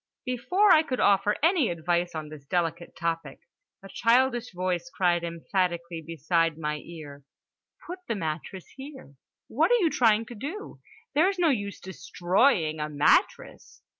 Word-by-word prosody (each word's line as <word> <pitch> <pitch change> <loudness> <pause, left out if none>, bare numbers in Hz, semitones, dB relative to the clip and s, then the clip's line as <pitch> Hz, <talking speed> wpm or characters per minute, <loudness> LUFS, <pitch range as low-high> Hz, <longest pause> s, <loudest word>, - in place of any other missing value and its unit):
Before 360 - +2
I 310 - +7
could 260 -5 -4
offer 205 +1 +3
any 330 - +3
advice 175 +1 -1
on 155 -1 -5
this 145 -2 -12
delicate 170 0 -2
topic, 165 0 -4 0.4
a - - -9
childish 240 +3 +1
voice 185 +5 -3
cried 175 -7 +1
emphatically 170 0 -2
beside 165 0 0
my 150 -1 -3
ear: 150 -3 -11 0.6
"Put 360 +2 -7
the 230 - -1
mattress 170 +1 -5
here! 270 - -11 0.3
What 300 +8 +1
are 485 - +5
you 335 -6 +2
trying 225 -2 +3
to 240 - -10
do? 295 - -7 0.3
There's 370 +6 +2
no 345 -3 +3
use 205 -7 -2
destroy 190 +4 +1
ing 155 0 -5
a 150 0 -3
mat 145 0 +4
tress!" - - -16
185 Hz, 155 wpm, -26 LUFS, 165-255 Hz, 0.6 s, I